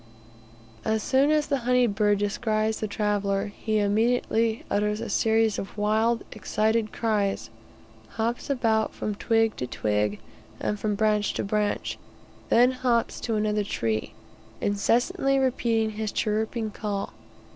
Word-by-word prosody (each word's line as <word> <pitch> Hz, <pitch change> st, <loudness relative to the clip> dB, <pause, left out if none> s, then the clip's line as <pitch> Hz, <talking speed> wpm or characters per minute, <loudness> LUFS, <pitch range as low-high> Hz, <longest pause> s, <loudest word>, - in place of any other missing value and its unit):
As 220 Hz, 0 st, 0 dB
soon 270 Hz, +2 st, +3 dB
as 305 Hz, -1 st, +3 dB
the 280 Hz, -2 st, 0 dB
honey 250 Hz, 0 st, +3 dB
bird 205 Hz, -1 st, +2 dB
descries 215 Hz, +1 st, 0 dB
the 215 Hz, -, -2 dB
traveller, 205 Hz, -1 st, -1 dB
he 215 Hz, -1 st, -1 dB
immediately 225 Hz, +2 st, +1 dB
utters 210 Hz, +1 st, 0 dB
a 230 Hz, -1 st, -5 dB
series 220 Hz, 0 st, +2 dB
of 195 Hz, -, -7 dB
wild, 220 Hz, +2 st, +1 dB
excited 220 Hz, 0 st, 0 dB
cries, 210 Hz, -4 st, -1 dB, 0.7 s
hops 230 Hz, +5 st, -2 dB
about 225 Hz, -5 st, +1 dB
from 210 Hz, -, -3 dB
twig 225 Hz, +1 st, +1 dB
to 125 Hz, -, -3 dB
twig, 105 Hz, -2 st, 0 dB, 0.4 s
and 210 Hz, -, -2 dB
from 210 Hz, -1 st, -1 dB
branch 210 Hz, -1 st, +1 dB
to -, -, -1 dB
branch, 210 Hz, +1 st, -1 dB, 0.5 s
then 245 Hz, +2 st, +5 dB
hops 250 Hz, -2 st, 0 dB
to 230 Hz, -, -2 dB
another 210 Hz, 0 st, +1 dB
tree, 110 Hz, -, -2 dB, 0.5 s
incessantly 240 Hz, +6 st, +1 dB
repeating 235 Hz, -4 st, +1 dB
his 215 Hz, 0 st, -3 dB
chirruping 220 Hz, +1 st, -1 dB
call. 200 Hz, -1 st, -4 dB
215 Hz, 135 wpm, -26 LUFS, 205-230 Hz, 0.7 s, then